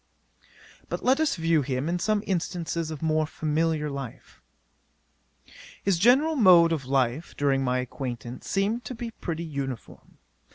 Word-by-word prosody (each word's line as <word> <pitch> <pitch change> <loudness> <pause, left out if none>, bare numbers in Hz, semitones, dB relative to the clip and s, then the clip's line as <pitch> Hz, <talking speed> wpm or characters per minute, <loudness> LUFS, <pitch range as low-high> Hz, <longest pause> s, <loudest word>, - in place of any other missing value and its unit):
'But - - -4
let 265 +3 +4
us 315 -1 +2
view 165 -2 +2
him 130 +1 -2
in 175 +1 -1
some 210 +3 +1
instances 170 -3 -2
of 155 0 -6
more 155 -1 +1
familiar 155 0 0
life. 140 -4 -8 1.4
'His 190 -4 +2
general 270 - +4
mode 180 - +7
of 150 -5 -1
life, 135 +3 0
during 135 -2 +2
my 125 -1 +1
acquaintance, 125 -2 -5
seemed 210 +5 0
to 255 - -5
be 230 0 -5
pretty 170 -6 -5
uniform. 135 -6 -7
160 Hz, 140 wpm, -26 LUFS, 140-195 Hz, 1.4 s, mode